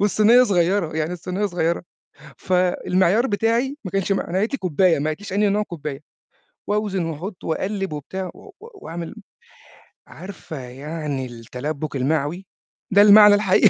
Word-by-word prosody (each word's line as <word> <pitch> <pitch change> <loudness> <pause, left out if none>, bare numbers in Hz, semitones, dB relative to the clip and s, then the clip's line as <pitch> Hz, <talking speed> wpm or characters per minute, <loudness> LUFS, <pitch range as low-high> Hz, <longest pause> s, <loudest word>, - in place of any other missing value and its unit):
والصينية 215 +4 +5
صغيرة، 175 -5 +1
يعني 160 +2 -1
الصينية 185 +4 -3
صغيرة، 170 -2 -1 0.6
فالمعيار 185 +4 +2
بتاعي 230 +6 0
ما 185 - -5
كانش 195 0 0
ما 195 - -2
أنا 180 - 0
قالِت 215 +6 0
لي 275 - -2
كوبّاية 180 -2 +2
ما 145 - -2
قالِتليش 185 +5 -7
أنهي 205 +1 +2
نوع 210 +2 +1
كوبّاية 150 -7 -6 0.7
وأوزن 205 -4 0
وأحُط 175 +5 -6
وأقلّب 195 +1 -2
وبتاع 185 +6 -5
و - - -14
وأعمل 305 - -8 0.9
عارفة 185 -5 -9
يعني 140 +2 -5
التلبُّك 130 +5 -6
المعوي؟ 150 +7 -1 0.5
ده 200 +1 +6
المعنى 210 0 +8
الحقيقي 205 0 +4
185 Hz, 140 wpm, -22 LUFS, 155-205 Hz, 0.9 s, المعنى